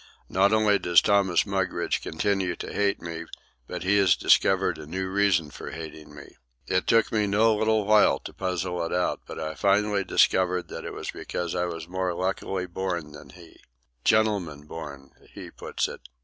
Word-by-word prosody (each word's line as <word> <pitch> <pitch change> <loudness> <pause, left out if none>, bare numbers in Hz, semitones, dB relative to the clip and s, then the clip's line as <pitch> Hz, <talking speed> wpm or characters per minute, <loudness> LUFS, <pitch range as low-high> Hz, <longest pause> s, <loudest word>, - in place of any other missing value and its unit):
Not 95 +2 +3
only 110 -2 +3
does 85 -1 +5
Thomas 100 -3 +2
Mugridge 95 -3 -1
continue 95 +2 -1
to - - -7
hate 100 -1 0
me, 85 0 -6 0.4
but - - -5
he 100 +2 +3
has 95 -3 +5
discovered 95 -3 +3
a 75 - -9
new 95 +4 -3
reason 95 -6 +1
for - - -8
hating 80 -2 -9
me. 70 - -13 0.3
It 95 +5 0
took 115 -1 +3
me 105 -2 +1
no 110 +2 +3
little 110 0 +1
while 105 0 +5
to - - -9
puzzle 90 -2 -2
it 85 - -4
out, 90 0 0
but - - -7
I 80 0 -4
finally 100 0 +2
discovered 90 -1 +2
that - - -7
it - - -6
was - - -5
because 85 -1 -4
I 90 0 0
was 85 -2 -6
more 90 -1 -2
luckily 95 0 -2
born 85 -3 -4
than 75 -1 -12
he—"gentleman 80 - -2
born," 70 -4 -9 0.2
he - - -9
put - - -3
it. - - -9
90 Hz, 175 wpm, -26 LUFS, 80-100 Hz, 0.4 s, does